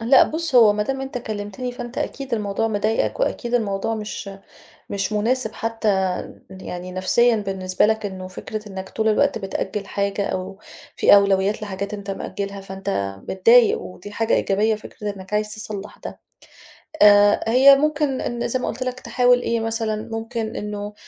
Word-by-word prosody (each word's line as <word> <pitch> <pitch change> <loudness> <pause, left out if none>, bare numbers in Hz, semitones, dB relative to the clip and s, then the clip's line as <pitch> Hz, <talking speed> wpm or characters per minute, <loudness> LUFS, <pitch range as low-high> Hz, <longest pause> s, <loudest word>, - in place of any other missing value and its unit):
لأ 250 +3 +6
بُص، 320 -2 -1
هو 225 -4 +7
ما 210 0 0
دام 270 +5 -3
أنت 270 -2 -4
كلِّمتني 215 +2 -5
فأنت 245 0 -7
أكيد 270 -3 -3
الموضوع 210 +1 -1
مضايقك 215 - 0
وأكيد 245 - -1
الموضوع 215 -1 0
مش 210 -2 -6 0.6
مش 200 +1 -2
مناسب 225 +2 0
حتّى 225 -1 -2 0.6
يعني 185 -1 -7
نفسيًا 225 +6 +3
بالنسبة 190 -3 0
لك 220 0 0
إنه 185 -2 -6
فكرة 210 +3 -7
إنّك 190 -1 -7
طول 220 0 -1
الوقت 220 +1 +2
بتأجِّل 195 0 -4
حاجة 200 0 -1
أو 190 +1 -4 0.4
في - - +6
أولويات 200 +1 +2
لحاجات 200 0 -5
أنت 200 -1 -5
مأجّلها، 200 0 -5
فأنت 190 - -3
متضايق 230 +5 +5
ودي 185 +3 -10
حاجة 225 +2 0
إيجابية 215 +3 +2
فكرة 210 -1 -7
إنّك 190 +1 -10
عايز 210 +1 0
تصلّح 210 -2 -6
ده. - - -9 0.8
آآ 205 0 +7
هي 270 +3 +8
ممكن 295 -2 0
إن 240 0 -2
زي 255 +2 -1
ما - - -3
قُلت 255 +3 -3
لك 255 0 -4
تحاول 245 0 +3
إيه 230 -1 0
مثلًا 225 -1 -2
ممكن 225 0 -4
إنه 210 0 -5
215 Hz, 160 wpm, -22 LUFS, 200-235 Hz, 0.8 s, هي